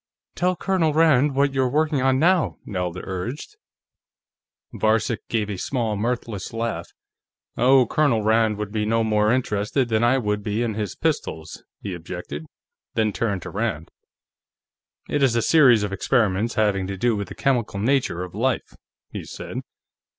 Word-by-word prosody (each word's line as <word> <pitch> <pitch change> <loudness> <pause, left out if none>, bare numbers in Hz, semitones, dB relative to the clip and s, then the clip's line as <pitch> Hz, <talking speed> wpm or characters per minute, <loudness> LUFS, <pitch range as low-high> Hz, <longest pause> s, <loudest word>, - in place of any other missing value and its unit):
"Tell 180 0 +1
Colonel 180 -4 +1
Rand 150 -4 +4
what 140 0 +2
you're 130 -2 +1
working 150 0 +1
on 130 0 +3
now," 175 +3 +2
Nelda 90 -2 -3
urged. 100 - -5 1.2
Varcek 110 +2 0
gave 110 -3 0
a 100 -2 -4
small 115 -5 -1
mirthless 115 -2 -3
laugh. 115 0 -3 0.7
"Oh, 130 +1 +5
Colonel 135 -5 +1
Rand 110 -1 +2
would 105 -1 -4
be 110 -1 -1
no 115 +2 +1
more 105 -1 +2
interested 120 +1 0
than 110 0 +1
I 120 +3 +4
would 105 -4 -1
be 105 +3 -1
in 115 -2 -1
his 105 -2 -4
pistols," 80 0 -3 0.2
he 100 - -4
objected, 85 -3 -7 0.5
then 110 -2 +1
turned 100 -6 -1
to - - -7
Rand. 100 -7 -3 1.2
"It 145 - -1
is 130 -4 +3
a 115 - +2
series 125 -9 +5
of 100 -1 -3
experiments 110 +1 +1
having 100 -4 +1
to 100 0 -5
do 120 +3 +1
with 100 -1 -3
the - - -9
chemical 120 -7 0
nature 120 -6 +1
of 90 - -8
life," 125 +5 -1 0.4
he - - -6
said. - - -8
115 Hz, 160 wpm, -23 LUFS, 105-130 Hz, 1.2 s, Oh